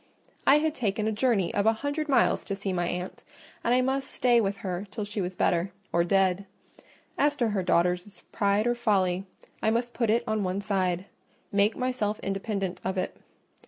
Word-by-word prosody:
I 280 - +8
had 310 0 +1
taken 215 -5 -1
a - - +1
journey 210 -5 +1
of 205 +1 +1
a 225 - +6
hundred 300 +1 -1
miles 270 - +3
to 200 - -3
see 195 -1 -3
my 175 -1 0
aunt, 180 +1 -4 0.4
and 235 - +1
I 250 +1 +4
must 265 +1 -1
stay 240 -2 +3
with 200 -1 -1
her 185 +2 -3
till 210 +1 -4
she 210 0 -3
was 180 0 -3
better—or 180 0 0
dead: 195 +1 +2 0.7
as 290 +1 +3
to 240 -5 +1
her 205 -2 0
daughters' 180 +2 0
pride 205 0 +2
or 240 - +3
folly, 195 -6 +1 0.4
I - - +2
must 235 +2 0
put 230 -3 0
it 230 +2 +3
on 220 -2 0
one 185 +1 -1
side, 190 -3 0 0.5
make 205 +2 +2
myself 250 -5 -1
independent 195 -1 -3
of 190 +1 -2
it. 185 - -2
205 Hz, 190 wpm, -27 LUFS, 190-235 Hz, 0.7 s, I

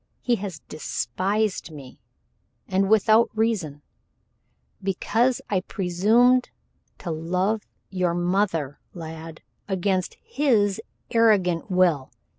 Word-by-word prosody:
He 240 -2 +2
has 190 -5 -6
despised 190 - -2
me, 140 -5 -12 0.7
and 195 +1 +1
without 220 +2 +5
reason 185 -11 -1 1.0
because 225 +6 +1
I 190 -3 0
presumed 220 +8 +2 0.5
to 175 - -5
love 180 +7 -1 0.3
your 180 -3 0
mother, 175 -5 0 0.2
lad, 160 -1 -8 0.2
against 190 -1 -1
his 220 -8 +1 0.3
arrogant 200 -7 +3
will. 175 -8 +2
190 Hz, 90 wpm, -24 LUFS, 170-215 Hz, 1.0 s, without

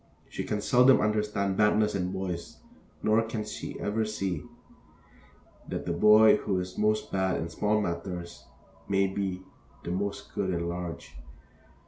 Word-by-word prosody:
She - - -5
can 105 - -2
seldom 125 +4 +5
understand 105 -2 0
badness 105 0 +3
in 90 -2 -1
boys, 95 -3 -5 0.5
nor 110 +1 +4
can 110 -1 -4 0.3
ever 110 +2 -1
see 95 -7 -3 1.2
that - - -4
the 85 - -1
boy 105 +4 +7
who 95 -3 -1
is 90 0 -5
most 105 0 0
bad 95 -1 0
in 80 - -4
small 105 +4 +1
matters 85 -2 -5 0.4
may 100 0 +3
be 95 -1 -3 0.4
the 85 - -4
most 100 +2 -3
good 95 -2 -1
in 85 -2 -1
large. 85 -6 -6
100 Hz, 140 wpm, -28 LUFS, 90-105 Hz, 1.2 s, boy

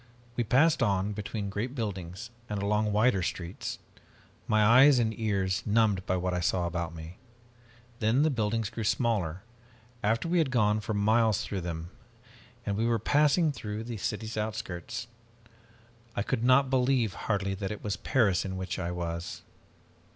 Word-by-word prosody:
We 120 - +1
passed 140 +9 +3
on, 100 -2 +1
between 105 0 -4
great 115 +7 -3
buildings 100 - -5 0.2
and 105 -1 -2
along 105 +1 +1
wider 105 -1 +3
streets, 90 0 -4 0.7
my 110 -1 +4
eyes 130 +5 +7
and 110 -2 +1
ears 100 -3 0
numbed 105 -3 +2
by 95 - +1
what 90 0 -1
I 90 - 0
saw 90 0 +1
about 85 -1 -3
me. 80 +2 -9 0.8
Then 115 +6 +3
the 155 - +3
buildings 110 -2 -1
grew 115 0 -4
smaller, 100 -6 0 0.6
after 110 +8 +1
we 175 +1 +2
had 155 -5 +2
gone 105 -4 +2
for 110 0 -3
miles 110 +1 +3
through 100 -2 -4
them, 85 0 -5 0.7
and 100 - -1
we 115 +2 +1
were 120 -1 +2
passing 150 - +3
through 105 -5 -5
the 115 -1 -5
city's 110 +2 -4
outskirts. 105 -2 -4 1.1
I 100 - 0
could 120 0 -1
not 130 +2 +4
believe, 125 -4 +2
hardly, 100 -2 -1
that 95 0 -4
it 105 - -6
was 105 -1 -1
Paris 105 -8 +2
in 95 -1 -4
which 95 0 -4
I 85 -2 -2
was. 85 -1 -4
105 Hz, 165 wpm, -29 LUFS, 95-115 Hz, 1.1 s, eyes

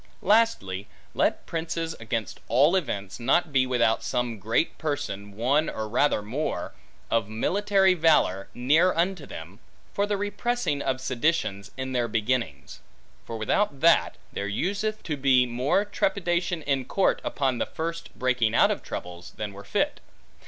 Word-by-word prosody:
Lastly, 180 - +2 0.3
let - - +1
princes, 165 0 -3
against 110 0 -3
all 145 +9 +4
events, 100 - -2
not 155 +6 +2
be 130 -1 +3
without 115 -3 +2
some 120 -1 -2
great 110 - 0
person, 100 - -4
one 140 +7 +2
or 110 - -4
rather 120 -1 +2
more, 130 +9 -3 0.4
of 115 -2 +1
military 190 - +2
valor, 155 - +3
near 155 +9 +4
unto 170 -2 0
them, 90 +7 -9 0.3
for 200 +1 +1
the 205 -1 0
repressing 205 -5 -1
of 130 -1 -1
seditions 130 -6 -1
in 130 0 -4
their 120 -2 0
beginnings. 110 - -2 0.5
For 115 - -4
without 140 - 0
that, 160 - +4 0.2
there 100 - -3
useth 200 - -2
to 150 -4 -3
be 130 -2 +4
more 125 +11 +1
trepidation 175 -4 -1
in 135 -2 0
court 195 +8 +1
upon 130 -4 -1
the - - -1
first 165 +1 -4
breaking 125 -3 +1
out - - +5
of - - -2
troubles, 90 0 -7
than 105 -2 -4
were 100 +1 -10
fit. - - -1
130 Hz, 150 wpm, -26 LUFS, 110-170 Hz, 0.5 s, out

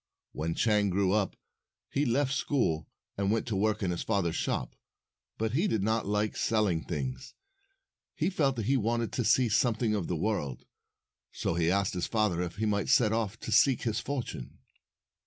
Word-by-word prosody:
When 80 +2 -3
Chang 105 -3 +2
grew 95 0 +1
up, 105 -3 0 0.6
he 145 0 +1
left 135 +3 +1
school, 80 - 0 0.3
and 100 -1 +1
went 115 - 0
to 115 -4 -2
work 105 +2 +1
in 90 - 0
his 85 - -3
father's 95 -7 0
shop. - - -2 0.6
But 110 0 -1
he 165 - +1
did 110 - 0
not 110 +1 0
like 105 +1 0
selling 105 -7 +1
things. 65 -6 -5 0.8
He - - 0
felt 140 -7 +1
that 115 -3 -3
he 135 +4 +3
wanted 115 0 0
to 125 - -1
see 120 +4 +4
something 110 0 +1
of 100 -5 -1
the 90 - -1
world. 80 - -2 0.7
So - - -2
he 85 0 +1
asked 100 +1 +1
his 90 -1 -2
father 105 -6 +1
if 90 0 -4
he 110 +2 -1
might 100 -2 0
set 110 -3 +4
off 110 -1 -2
to - - -5
seek 125 +5 +4
his 110 -3 0
fortune. 140 -4 -5
105 Hz, 185 wpm, -30 LUFS, 95-115 Hz, 0.8 s, see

